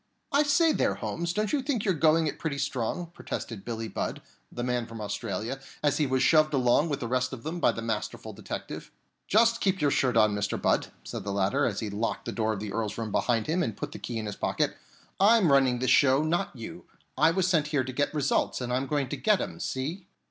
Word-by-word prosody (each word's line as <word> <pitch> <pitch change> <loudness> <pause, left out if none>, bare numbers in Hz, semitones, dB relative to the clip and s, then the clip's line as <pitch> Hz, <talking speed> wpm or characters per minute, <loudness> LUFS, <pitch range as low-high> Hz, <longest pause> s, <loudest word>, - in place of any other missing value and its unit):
"I 285 - +4
say 300 +3 +4
there, - - +1
Holmes, 170 0 -3
don't 210 - -1
you 290 - +2
think 255 -6 -1
you're 190 - +3
going 160 0 +3
it 150 - -3
pretty 150 -3 -2
strong?" 140 +5 -2
protested 110 -10 -6
Billie 115 -1 -4
Budd, - - -4 0.3
the 120 - -4
man 125 -2 -1
from 115 0 -9
Australia, 110 +4 -3 0.2
as 145 -1 +2
he 150 - +2
was 130 0 +1
shoved 155 +2 +4
along 130 +5 +3
with 145 - -2
the 120 - -2
rest 130 +2 0
of 120 - -7
them 165 +3 -4
by - - +4
the 115 - -6
masterful 110 -2 -4
detective. - - -7 0.4
"Just 230 +2 +4
keep 190 -1 +1
your 145 -2 +2
shirt 125 -3 +2
on, 110 -2 +5
Mr. 100 0 -1
Budd," - - +1 0.2
said - - -6
the 100 - -3
latter, 100 +8 +1
as 105 -5 -3
he 110 - -3
locked 110 +3 -2
the - - -3
door 110 -1 0
of 100 - -5
the 105 -1 -5
Earl's 110 -1 -2
room 110 -2 -3
behind 115 0 +1
him 170 +4 0
and 115 -8 -2
put - - -5
the - - -8
key 120 - -4
in 110 - -3
his 105 -1 -4
pocket. - - 0 0.4
"I'm 200 -4 +5
running 135 -3 +4
this 125 +1 +1
show, 135 +2 +5
not 170 +1 -1
you. 130 +9 -8 0.3
I 155 +4 +5
was 180 +2 +1
sent 160 -5 +2
here 145 -3 +1
to 130 0 -6
get 145 +3 0
results, 145 -3 0
and 125 -1 -3
I'm 130 +2 0
going 145 -2 0
to - - -3
get 210 -3 +3
'em, - - -5
see?" 160 +9 -4
135 Hz, 240 wpm, -28 LUFS, 115-165 Hz, 0.4 s, on